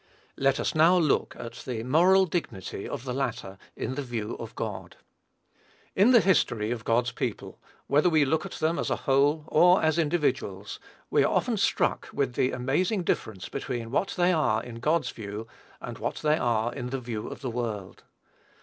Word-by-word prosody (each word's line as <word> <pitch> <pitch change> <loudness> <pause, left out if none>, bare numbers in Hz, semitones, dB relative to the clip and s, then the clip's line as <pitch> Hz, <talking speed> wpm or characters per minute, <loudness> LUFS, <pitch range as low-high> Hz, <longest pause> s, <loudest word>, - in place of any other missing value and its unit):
Let 135 0 +1
us - - -1
now 165 +4 +5
look 155 -5 +1
at 115 - -7
the 115 -3 -3
moral 180 +9 +5
dignity 100 - -4
of 135 -4 -5
the 130 -2 -4
latter, 100 -7 -3 0.2
in 130 - -3
the 145 - -3
view 120 -5 -4
of - - -8
God. - - -5 1.0
In 200 +5 +5
the 240 -3 +7
history 120 - +2
of 120 -3 -3
God's 120 +2 +1
people, 125 -3 -5 0.3
whether 150 +5 +3
we 155 -3 +4
look 155 +3 0
at - - -7
them 160 +2 0
as - - -1
a - - +1
whole, 145 +2 +3
or 180 +4 +5
as 160 +1 +2
individuals, 135 - -1 0.3
we - - +4
are - - +1
often - - +1
struck - - 0
with 135 -3 -1
the 125 - +1
amazing 175 - 0
difference 100 - -2
between 115 -2 -5
what 190 +8 0
they 180 +1 +3
are 120 -9 +1
in 115 -1 -8
God's 155 +7 +1
view, 105 0 -7 0.3
and - - -7
what - - -2
they 150 0 +1
are 120 0 0
in 125 -2 -5
the 135 +1 -3
view 115 -3 -5
of - - -8
the 130 -3 -3
world. 110 -6 -4
135 Hz, 185 wpm, -27 LUFS, 115-160 Hz, 1.0 s, the